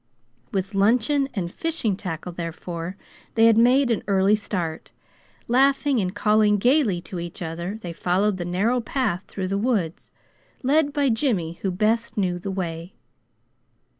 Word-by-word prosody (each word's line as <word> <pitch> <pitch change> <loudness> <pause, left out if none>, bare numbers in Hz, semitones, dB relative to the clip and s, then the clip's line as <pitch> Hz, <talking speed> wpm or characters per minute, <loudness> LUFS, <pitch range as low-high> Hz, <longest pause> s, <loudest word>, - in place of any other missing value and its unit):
With 195 +1 -2
luncheon 245 +8 +2
and 175 -3 -3
fishing 325 - -1
tackle, 180 -2 -5
therefore, 170 +1 -6 0.4
they 225 0 +5
had 230 -1 +6
made 250 +3 +4
an 225 - 0
early 195 +1 +4
start. 180 -6 -4 0.6
Laughing 270 +2 +3
and 185 -1 -2
calling 210 0 +3
gaily 240 - +2
to 175 0 -7
each 170 0 -6
other 170 +4 -4
they 175 -4 -6
followed 185 +4 +1
the 175 - -3
narrow 210 +8 +1
path 225 -7 -2
through 185 -2 -4
the 195 +1 0
woods, 205 -8 -1 0.5
led 290 +2 +3
by 285 -2 +1
Jimmy, 215 - -1
who 195 - 0
best 220 +4 0
knew 180 -3 0
the 195 - -5
way. 175 -2 -4
200 Hz, 150 wpm, -24 LUFS, 180-240 Hz, 0.6 s, had